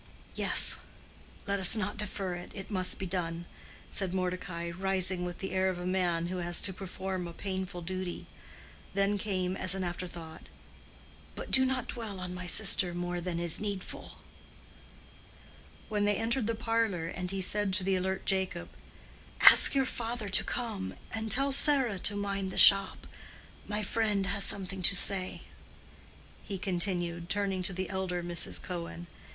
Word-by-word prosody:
"Yes; - - +5 0.7
let 200 -1 -1
us 190 +4 +8
not 205 0 -3
defer 195 -3 -3
it. 175 0 -8
It 195 +2 -9
must 185 -2 +3
be 190 - -5
done," 170 -2 -4 0.5
said 190 -2 +1
Mordecai, 180 -2 -3
rising 185 0 0
with 175 0 -6
the 190 - -5
air 190 0 +1
of 185 - -4
a 180 - -6
man 180 -2 0
who 185 +1 -4
has 175 -1 -1
to 190 - +2
perform 185 -1 -5
a 170 - -9
painful 190 -1 -5
duty. 185 0 -5 0.7
Then 200 +1 +1
came, 185 -2 -2
as 185 0 -1
an 190 - -3
afterthought, 175 -2 -7 0.9
"But - - -8
do 260 0 +4
not 260 -2 -2
dwell 220 -5 -6
on 180 0 -6
my 180 0 -7
sister 185 -2 +4
more 175 0 -3
than 170 -1 -4
is 170 -2 +2
needful." 200 -3 -6 1.7
When 210 -1 -1
they 205 0 +2
entered 225 +1 -1
the 230 - -1
parlor 225 -7 -1 0.2
he 195 +1 -4
said 205 +2 +1
to 185 - 0
the 190 +1 +1
alert 190 +1 -2
Jacob, 190 - -1 0.7
"Ask - - +8
your 270 -1 +2
father 235 -3 -4
to 195 - +3
come, 220 -6 -4 0.2
and 220 0 -4
tell 275 +5 +4
Sarah 270 -7 +5
to 205 - +1
mind 200 -1 -3
the - - -7
shop. 195 0 +5 0.6
My 210 0 -3
friend 205 -1 0
has 200 +1 +2
something 190 -1 +1
to 195 - +4
say," 185 0 -1 1.0
he 200 - -5
continued, 175 -2 -1
turning 195 -2 -1
to 185 +1 0
the 185 0 -4
elder 185 -2 -3
Mrs. 175 -1 0
Cohen. 170 -1 -7
190 Hz, 160 wpm, -30 LUFS, 180-205 Hz, 1.7 s, us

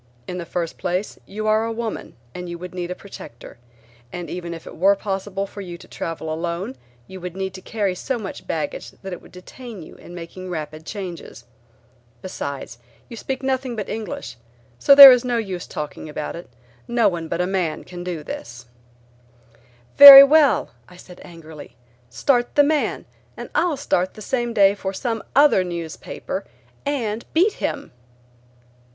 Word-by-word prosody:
"In 180 0 -5
the 170 - -7
first 170 -2 -4
place 180 +3 -3
you 215 +2 -5
are 215 +1 +2
a 230 - -3
woman 225 -1 -5 0.2
and 180 -1 -7
would 180 +1 -8
need 180 -1 -4
a 180 - -4
protector, 120 -13 -12 0.5
and 175 -1 -7
even 175 -1 -5
if 165 -1 -8
it - - -10
were 195 +4 +4
possible 195 0 -4
for 200 +1 -10
you 175 -3 -8
to - - -16
travel 160 -1 -5
alone 170 -2 -4 0.3
you 190 +4 -11
would 180 +1 -7
need 190 -1 -3
to 190 - -10
carry 205 -2 -2
so 255 +8 -3
much 205 -4 -8
baggage 155 -3 -4
that 190 -1 -6
it - - -8
would - - -17
detain 210 +2 -11
you - - -13
in 175 - -12
making 180 +2 -9
rapid 155 -1 -6
changes. 180 - -8 0.8
Besides 140 -9 -6 0.3
you 235 - -8
speak 265 +3 -5
nothing 260 -2 -2
but 210 -3 -4
English, 215 - -6 0.4
so 280 - +6
there 275 -1 +13
is 250 -1 +3
no 245 -1 -1
use 190 -6 -4
talking 150 +1 -7
about 150 0 -5
it; 170 - -10 0.4
no 235 -1 +2
one 170 -3 -2
but 170 - -3
a 180 - +1
man 180 -4 -2
can 175 -1 -9
do 175 -4 -5
this." 120 -3 -8 1.3
"Very 280 -1 +14
well," 295 0 +4 0.2
I 180 - -15
said 180 0 -14
angrily, 160 -5 -12 0.3
"Start 240 - 0
the 290 - +6
man, 300 +1 0 0.3
and - - -8
I'll 340 -5 +1
start 185 -9 -1
the 215 - -9
same 240 -1 -1
day 200 -3 +5
for 195 -1 -5
some 225 +2 -3
other 285 -9 +5
newspaper 170 -3 -6 0.4
and 235 -6 -2
beat 385 +6 +4
him." - - -3
190 Hz, 175 wpm, -22 LUFS, 170-230 Hz, 1.3 s, Very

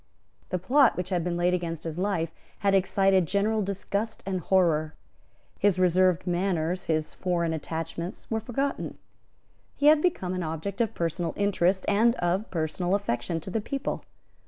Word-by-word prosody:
The 185 - 0
plot 255 +8 +4
which 180 0 -3
had 180 -3 0
been 175 0 -1
laid 175 +1 +2
against 170 -3 -2
his 165 0 -4
life 180 -4 0 0.3
had 200 -1 +3
excited 195 -1 +3
general 210 +3 +1
disgust 200 +2 -3
and 190 -1 -1
horror. 165 -4 +2 0.6
His 200 -2 +3
reserved 185 -1 +3
manners, 180 -1 0
his 155 -1 -1
foreign 170 -3 -1
attachments 165 +3 -5
were 225 - +1
forgotten. 265 +5 -3 0.8
He 285 - -1
had 300 0 +7
become 190 - 0
an 185 - -2
object 165 +7 -3
of 225 -1 0
personal 170 0 -1
interest 190 -2 +1
and 225 +4 +4
of 180 +5 -1
personal 170 +2 -1
affection 170 -3 -2
to 190 - -7
his 220 - 0
people. 275 +5 -3
185 Hz, 155 wpm, -27 LUFS, 170-200 Hz, 0.8 s, had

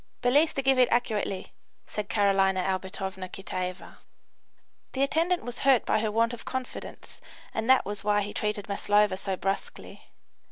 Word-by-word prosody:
"Belease 290 +6 +4
to 275 - -2
giff 265 -1 +4
it 250 -1 +5
accurately," 215 -5 -1 0.3
said 210 0 -5
Carolina 195 -3 +3
Albertovna 190 0 -3
Kitaeva. 185 -1 -5 1.0
The 270 - +1
attendant 335 +5 +1
was 245 0 -6
hurt 265 -3 +4
by 220 - +2
her 215 0 -1
want 230 +2 +2
of 240 - -7
confidence, 260 -1 -6 0.3
and 220 +2 -2
that 260 - +6
was 205 +1 -4
why 205 0 +2
he 205 - -6
treated 210 -1 -2
Maslova 205 0 +2
so 190 0 -3
brusquely. 195 +2 -5
210 Hz, 155 wpm, -28 LUFS, 195-245 Hz, 1.0 s, that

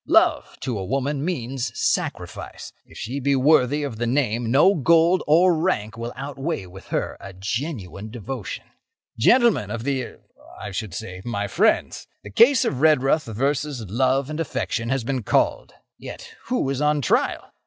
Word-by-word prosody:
Love, - - +3
to 120 -6 -3
a - - -3
woman, 135 +7 -1
means 130 -7 -3
sacrifice. - - -3
If - - -15
she 130 +6 -4
be 140 +1 +1
worthy 145 +1 +3
of 135 -6 -4
the 120 +1 -1
name, 120 -3 0
no 145 +10 +5
gold 170 +3 +4
or 170 +4 +5
rank 135 - -1
will 115 +1 -5
outweigh 140 - -4
with 95 +1 -13
her - - -2
a 100 - -10
genuine 105 - -4
devotion. 120 -1 -6 0.6
"Gentlemen 235 - +4
of 115 -1 -4
the—er—I 130 -5 -6
should 95 -2 -5
say, 95 -5 -7
my 100 -4 -2
friends, - - +1 0.2
the 100 - -10
case 245 - +5
of 130 -1 -2
Redruth 155 -1 +3
versus 135 +4 -1
love 130 +5 +1
and 155 - -4
affection 115 -6 -2
has 135 -2 0
been 130 +1 -2
called. 100 - 0 0.3
Yet, - - -9
who 245 - 0
is 135 +1 -2
on 150 -1 +2
trial? - - 0
130 Hz, 160 wpm, -23 LUFS, 115-150 Hz, 0.6 s, no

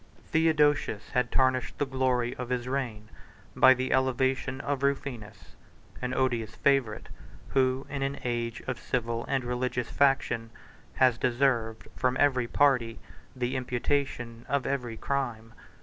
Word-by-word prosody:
Theodosius 150 -8 +2
had 125 -2 0
tarnished 130 -1 +1
the 145 - +1
glory 130 -2 0
of 125 -1 -5
his 125 -1 -2
reign 120 -6 -3 0.5
by 130 0 +7
the 130 +1 -1
elevation 130 0 +1
of 140 -1 -2
Rufinus; 135 -6 -3 0.5
an 125 0 -2
odious 120 -4 0
favorite, 135 -6 +1 0.4
who, 130 0 +1
in 140 -1 -4
an 135 +1 -1
age 120 -1 -2
of 130 -2 -3
civil 115 -2 -2
and 135 -2 0
religious 125 0 -2
faction, 135 -5 +2 0.5
has 125 -3 +3
deserved, 120 -3 0
from 130 0 0
every 130 -4 +3
party, 125 -5 +2 0.4
the 125 +1 -2
imputation 125 -2 -2
of 140 -2 0
every 125 -5 -2
crime. 115 -5 -3
130 Hz, 135 wpm, -28 LUFS, 120-135 Hz, 0.5 s, by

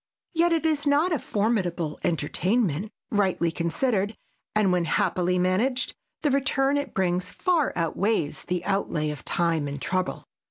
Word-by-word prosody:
Yet 340 +1 +3
it 325 -1 +1
is 300 -2 +1
not 295 +6 +3
a 305 - +1
formidable 185 -9 -1
entertainment, 185 - 0 0.2
rightly 190 -5 +2
considered, 200 +5 0 0.4
and 210 -3 +3
when 180 -1 +2
happily 180 +2 +1
managed 205 +9 +1 0.3
the 295 - +3
return 270 0 +2
it 285 - -4
brings 180 0 0
far 345 -6 +1
outweighs 170 +1 0
the 180 -1 -2
outlay 170 -6 0
of 145 -4 -8
time 165 -4 0
and 145 0 -5
trouble. 185 +5 -2
190 Hz, 145 wpm, -26 LUFS, 170-260 Hz, 0.4 s, Yet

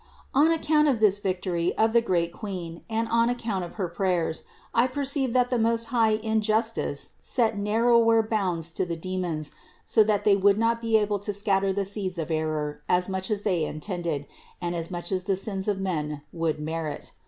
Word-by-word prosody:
363. 275 - +4
On 320 +2 +5 0.3
account 300 - +5
of 260 -6 +2
this 205 -2 +4
victory 180 -3 -1
of 220 0 +3
the 235 - +5
great 170 -6 0
Queen 175 -5 -6
and 225 +1 0
on 230 +1 +3
account 225 -6 -2
of 175 - -8
her 190 -4 -2
prayers, 170 -2 -1 0.3
I 235 +2 +4
perceived 270 -1 -1
that 250 0 +3
the 245 - +2
Most 230 0 +1
High 225 -3 +4
in 220 0 0
justice 220 +2 -1
set 225 -4 +1
narrower 225 +2 +3
bounds 185 -7 -1
to 170 - -1
the 170 - -2
demons, 170 -3 -3 0.3
so 220 - +5
that 210 -1 +1
they 205 -1 +5
would 200 +1 +4
not 230 +1 +1
be 225 -1 +3
able 210 -1 0
to 205 +1 -2
scatter 195 -1 +1
the 200 +1 -1
seeds 195 -2 -3
of 165 0 -3
error 155 -2 -2
as 180 +1 +2
much 190 0 -3
as 210 -2 -1
they 180 -6 +1
intended 155 -2 -3 0.3
and 175 0 -2
as 165 -1 -3
much 175 -1 -5
as 185 -1 -1
the 195 -1 +1
sins 195 0 -4
of 205 -2 0
men 150 -6 -3
would 165 -3 -1
merit. 155 -1 -4
195 Hz, 200 wpm, -26 LUFS, 170-225 Hz, 0.3 s, On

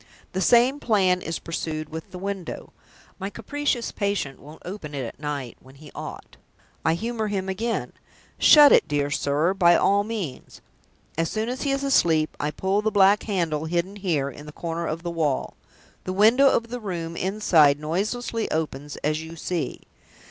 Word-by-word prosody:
The 190 - -2
same 245 +8 +4
plan 190 -7 +2
is 165 -1 -3
pursued 155 -2 -4
with 160 0 -7
the 185 - -9
window. 195 -1 -5 0.5
My 195 0 -3
capricious 250 +2 -2
patient 200 -10 -2
won't 150 +3 -14
open 175 -6 -7
it 135 -3 -3
at 115 - -9
night, 145 -5 -4
when 130 +1 -17
he 150 +1 -14
ought. - - -8 0.5
I 160 0 +2
humor 225 +3 -2
him 195 -2 -2
again. 225 +5 -2 0.5
'Shut 295 -2 +8
it, - - +5
dear 145 -1 -1
sir, 145 +6 +1
by 175 -3 +5
all 200 +1 +3
means!' 205 - -6 0.6
As 165 0 +1
soon 220 +1 -2
as 255 +1 -4
he 285 - -1
is 275 0 0
asleep, 165 - +2
I 150 - -1
pull 190 +6 0
the 220 - +1
black 200 0 +5
handle 165 -7 -1
hidden 175 +4 -1
here, 155 -8 -1
in 150 +3 -12
the - - -8
corner 170 +1 -4
of 165 +2 -4
the 170 - -3
wall. 155 -5 -1 0.5
The 185 - -2
window 230 +8 +6
of 230 -2 0
the 245 - -4
room 170 -6 -5
inside 170 -7 +3
noiselessly 215 +9 -2
opens, 150 -2 -3
as 155 +1 0
you 160 +1 -9
see. 170 0 -3
180 Hz, 175 wpm, -24 LUFS, 155-210 Hz, 0.6 s, Shut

